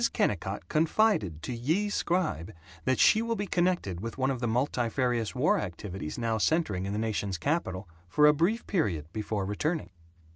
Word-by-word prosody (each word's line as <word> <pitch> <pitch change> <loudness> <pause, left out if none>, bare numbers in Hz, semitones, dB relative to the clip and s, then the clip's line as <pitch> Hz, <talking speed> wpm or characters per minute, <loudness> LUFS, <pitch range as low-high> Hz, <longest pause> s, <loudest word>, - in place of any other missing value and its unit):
Kennicott 85 - -1
confided 155 - +1
to 125 - -3
Ye 160 - 0
Scribe 170 - -1 0.3
that 130 -1 +2
she 220 - +6
will 230 0 -1
be 205 - -2
connected 175 - 0
with 115 +3 -5
one 135 0 +1
of 130 - -3
the 120 - -1
multifarious 120 -1 0
war 155 +11 +3
activities 90 - -5
now 115 -2 0
centering 105 - +1
in 100 - -3
the - - -2
Nation's 105 -4 -1
Capital 95 - -2 0.2
for 150 +11 +4
a 150 - +7
brief 180 +10 +1
period 95 - 0
before 105 -2 -2
returning. 150 - -2
125 Hz, 170 wpm, -29 LUFS, 100-165 Hz, 0.3 s, a